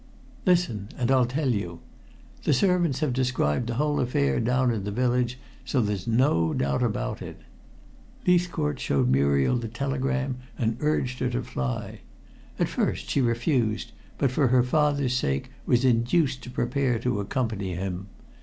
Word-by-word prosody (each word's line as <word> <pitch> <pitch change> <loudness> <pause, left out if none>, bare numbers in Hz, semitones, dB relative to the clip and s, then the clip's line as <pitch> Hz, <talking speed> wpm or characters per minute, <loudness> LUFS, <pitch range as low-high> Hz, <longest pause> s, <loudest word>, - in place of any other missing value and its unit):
"Listen, 165 - +2
and 125 0 +1
I'll 130 -2 +4
tell 135 +2 -1
you. 90 -6 -3 0.6
The - - +2
servants 175 -3 +2
have 150 -5 +1
described 125 - 0
the 120 - -2
whole 150 +3 +1
affair 70 - +1
down 125 +2 +2
in 105 -3 -3
the 100 - -3
village, 125 +2 0 0.3
so 135 - 0
there's 105 -4 -1
no 115 - +2
doubt 70 0 0
about - - -1
it. - - -8 0.9
Leithcourt 175 -6 +1
showed 65 -3 +1
Muriel 70 - +3
the 120 -1 -4
telegram 135 +2 -2 0.2
and 115 -1 0
urged 130 -4 0
her 125 - 0
to 125 +1 -2
fly. 65 - -4 0.6
At - - +1
first - - -2
she 140 - +2
refused, 120 -2 0 0.3
but 135 -3 +1
for 135 +1 +2
her 125 0 +4
father's 140 -1 +1
sake 70 - -1 0.2
was 120 +1 +3
induced 130 +3 +2
to - - -9
prepare 125 0 0
to 115 -2 -1
accompany 100 -4 -2
him. 95 +1 -4
125 Hz, 155 wpm, -26 LUFS, 105-135 Hz, 0.9 s, I'll